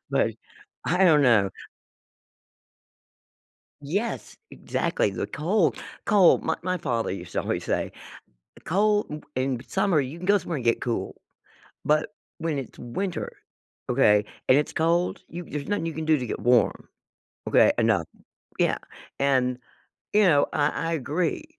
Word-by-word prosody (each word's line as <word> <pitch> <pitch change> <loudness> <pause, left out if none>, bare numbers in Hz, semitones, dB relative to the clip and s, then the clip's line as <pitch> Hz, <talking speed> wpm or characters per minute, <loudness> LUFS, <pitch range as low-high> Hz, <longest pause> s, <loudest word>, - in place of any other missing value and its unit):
But, - - +1 0.5
I 180 +3 +2
don't 150 -4 +6
know. 110 -7 +4 2.3
Yes, 200 +11 -3
exactly, - - -1
the - - -4
cold - - +1 0.3
cold 195 -4 +5
my 160 - 0
my 185 0 0
father 115 - -1
used 90 -2 -7
to - - 0
always - - -2
say, - - -1 0.7
"Cold, 210 +4 +2
m 150 0 -6
in 130 -1 -1
summer, 175 -7 +2
you 135 +5 -6
can 180 - -7
go 205 +1 +5
somewhere 175 -4 -4
and 125 - -6
get 115 - +2
cool, 120 -2 -2 0.7
but, 155 +7 +2 0.3
when 160 -3 -2
it's 130 - -7
winter, 175 +10 -3 0.6
okay, 105 -5 +4 0.2
and 130 - +6
it's 150 - -1
cold, 170 +2 +1
you 175 +1 -7
there's 150 +1 -6
nothing 205 -5 -1
you 165 - -2
can 160 +1 -4
do 155 -1 +3
to 125 - -4
get - - -4
warm, 120 -1 +2 0.6
okay, - - +5
eh, - - +3
none." - - +2 0.5
Yeah, - - +2 0.4
and, 130 -2 +2 0.6
you 210 - +5
know, 145 -7 +4
I 145 0 +2
I 165 0 -2
agree, 165 - -1
150 Hz, 150 wpm, -25 LUFS, 130-180 Hz, 2.3 s, don't